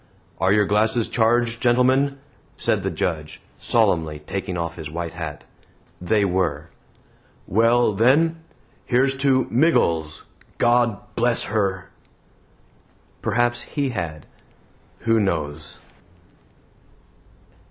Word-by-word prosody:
"Are 95 - +2
your 105 0 +4
glasses 110 +3 +2
charged, 115 0 +1
gentlemen?" 130 +3 +2 0.4
said - - 0
the - - -2
Judge, 80 -4 -3 0.2
solemnly 80 -2 +1
taking 95 +4 -5
off 85 0 -4
his 75 - -7
white 85 +1 -5
hat. 80 -4 -7 0.6
They 105 +3 +1
were. 85 -4 -1 0.7
"Well, 115 +2 +3
then, 145 +10 +3 0.5
here's 135 +2 +2
to 135 -2 +2
MIGGLES. 85 - +1 0.3
GOD 120 -3 +2 0.2
BLESS 120 0 +1
HER!" 100 -4 -2 1.3
Perhaps 120 +2 0
He 140 -3 -3
had. 85 - -5 0.8
Who 115 -1 +2
knows? 80 -6 -3
105 Hz, 100 wpm, -22 LUFS, 85-120 Hz, 1.3 s, your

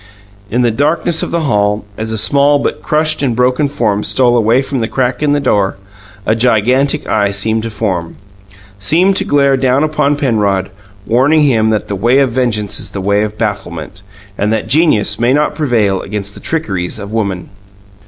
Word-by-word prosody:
In 120 +4 0
the 120 - +2
darkness 155 +6 +1
of - - -3
the 170 - -1
hall, 105 -6 0
as 110 +1 -4
a 110 - -2
small 140 +6 +3
but 140 - -3
crushed 155 0 0
and 130 -5 0
broken 125 +4 +1
form 110 -7 -1
stole 125 -2 +2
away 120 +3 +2
from 135 -1 -3
the 115 - -1
crack 130 +2 -1
in 145 -1 +2
the 145 - +1
door, 100 -8 0 0.5
a - - +2
gigantic 125 +5 +1
Eye 105 -2 +1
seemed 110 +3 0
to 115 - -4
form 95 -6 -3 0.6
seemed 175 - +2
to - - +1
glare 140 -1 +2
down 130 +2 +1
upon 150 -2 +1
Penrod 105 -9 0 0.3
warning 140 +7 +3
him 115 -6 +2
that 110 -1 -1
the - - -4
way 120 +7 +2
of 135 -3 +2
vengeance 115 -5 -1
is - - -4
the 100 - -6
way 100 +2 +1
of 105 0 -3
bafflement, 95 -4 -4 0.4
and 105 +1 0
that 110 - -1
genius 130 -9 +2
may 120 +2 +2
not 150 +1 +1
prevail 115 - 0
against 100 0 -5
the - - -11
trickeries 95 - -2
of 100 0 -8
women. 100 -5 -2
115 Hz, 190 wpm, -14 LUFS, 105-140 Hz, 0.6 s, small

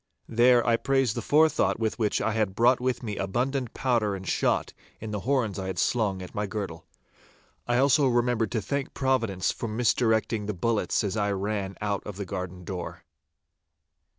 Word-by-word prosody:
Then 120 +1 +4
I 115 -1 +3
praised 135 -4 +1
the - - -3
forethought 155 -3 +3
with 110 0 -1
which 105 -2 +1
I 110 - +1
had 105 -3 -1
brought 120 +3 +4
with 125 0 -1
me 105 -3 -4
abundant 125 +6 -2
powder 115 -6 +1
and 95 -1 -8
shot - - 0 0.3
in 110 -1 -6
the 105 - -2
horns 115 -8 +1
I 95 - -4
had 95 -2 -4
slung 100 -6 0
at 90 - -10
my 105 0 -2
girdle. 95 -5 -5 0.8
I 120 0 +2
also 140 +2 +4
remembered 120 -3 +1
to 110 -4 -1
thank 140 +6 -3
Providence 115 -9 +1
for 115 - -5
misdirecting 110 -1 +1
the 105 - -2
bullets 110 +5 0
as 100 0 -2
I 105 -2 0
ran 100 0 -3
out 100 -1 -1
of 105 - -6
the 100 - -4
garden 90 -1 -5
door. 90 -1 -6
110 Hz, 180 wpm, -27 LUFS, 100-125 Hz, 0.8 s, Then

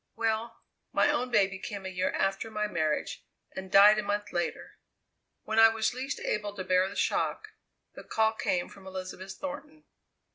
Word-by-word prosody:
"Well, 225 +1 -2 0.3
my - - +3
own 250 +1 -1
baby 195 -5 +2
came 200 0 -6
a - - -3
year 185 0 -1
after 195 +3 -1
my 210 -1 -1
marriage 160 -6 -2 0.3
and 190 0 -7
died 210 +2 +8
a - - +1
month 205 0 -2
later. 175 -1 -3 0.6
When 220 0 0
I 225 0 +9
was 225 +1 0
least 265 +3 -4
able 205 -1 -2
to 185 - -4
bear 185 +1 +2
the 200 - -10
shock, - - -1 0.4
the - - -10
call 220 0 +1
came 180 -5 -1
from 195 -1 -14
Elizabeth 185 0 -7
Thornton. 295 +2 -8
205 Hz, 175 wpm, -29 LUFS, 190-225 Hz, 0.6 s, I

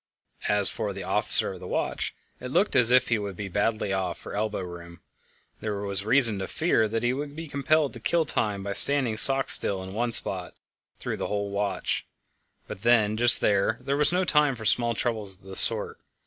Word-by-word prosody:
As 105 -1 +1
for - - -6
the - - -9
officer - - +2
of - - -13
the - - -11
watch, - - -5 0.2
it 125 - -9
looked 195 +8 -1
as 125 -3 +5
if 125 0 +2
he 115 -2 -1
would 100 -2 -8
be 100 +2 -8
badly 100 +1 -3
off 95 -3 -5
for - - -12
elbow 105 -1 -4
room; 85 -1 -12 0.6
there 105 -2 -6
was 100 -1 -2
reason 115 -2 +1
to 95 - -6
fear 155 -9 -1
that 115 +2 -5
he 120 +1 -1
would 145 +1 -8
be 165 +1 -9
compelled 145 +1 -2
to 120 - -10
kill 165 +8 -2
time 105 -7 -3
by 100 0 -6
standing 130 -2 +2
stock 135 +4 +7
still 95 -1 +3
in 95 0 -11
one 120 +3 -4
spot 95 -5 +1 0.4
through - - -7
the - - -6
whole 100 -1 -5
watch; 100 0 -4 0.6
but - - -11
just 120 0 +2
then 100 +2 -1
there 135 +2 -4
was 150 +2 0
no 180 +1 -2
time 150 -5 0
for 110 -2 -11
small 120 +1 +1
troubles 110 -6 -4
of 95 - -29
this 95 0 +2
sort. - - +8
110 Hz, 205 wpm, -23 LUFS, 100-130 Hz, 0.6 s, sort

